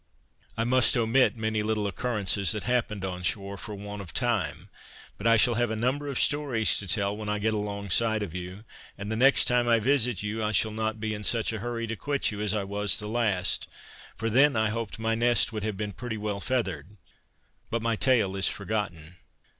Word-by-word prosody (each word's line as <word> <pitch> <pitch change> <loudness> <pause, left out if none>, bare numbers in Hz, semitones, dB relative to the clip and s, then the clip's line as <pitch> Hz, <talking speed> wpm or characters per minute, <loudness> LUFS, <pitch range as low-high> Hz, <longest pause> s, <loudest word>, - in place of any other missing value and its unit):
I 115 - +1
must 125 +1 +3
omit 120 +2 +3
many 110 -1 -1
little 105 -1 -1
occurrences 100 -2 0
that 105 - -4
happened 110 -5 -1
on 90 -1 -5
shore, 100 +2 -2
for 105 +1 -7
want 100 0 -7
of 90 -4 -10
time; 100 - -1 0.4
but 105 - -3
I 115 0 +6
shall 120 +2 +4
have 120 0 0
a 110 - -2
number 130 +6 -1
of 140 - -2
stories 140 -7 +2
to 100 - -3
tell 100 +3 0
when 105 0 -5
I 105 - 0
get 110 +1 0
alongside 105 +1 0
of 90 -6 -6
you; 90 +4 -7 0.3
and 100 +2 -5
the - - -1
next 135 +4 +5
time 125 -1 +2
I 115 -1 +5
visit 125 -4 +1
you 110 +2 -3
I 105 0 -1
shall 110 - +2
not 110 0 -2
be 110 0 -2
in 105 0 -6
such 115 +1 +1
a 110 - -4
hurry 115 +1 -3
to 115 0 -4
quit 140 +1 -1
you 105 0 -5
as 105 -2 0
I 105 - -1
was 100 +1 0
the 105 - -2
last, 105 -5 +1 0.5
for 115 - -3
then 135 +5 +4
I 110 -1 +2
hoped 115 +1 -4
my 115 0 0
nest 120 0 +2
would 110 -2 -4
have 105 -2 -3
been 105 -1 -4
pretty 120 -1 -5
well 105 -1 -3
feathered: 100 - -2 0.7
But 115 0 -2
my 115 -1 +1
tale 110 -6 +2
is 95 -1 +2
forgotten. 90 -5 -3
110 Hz, 215 wpm, -27 LUFS, 100-115 Hz, 0.7 s, I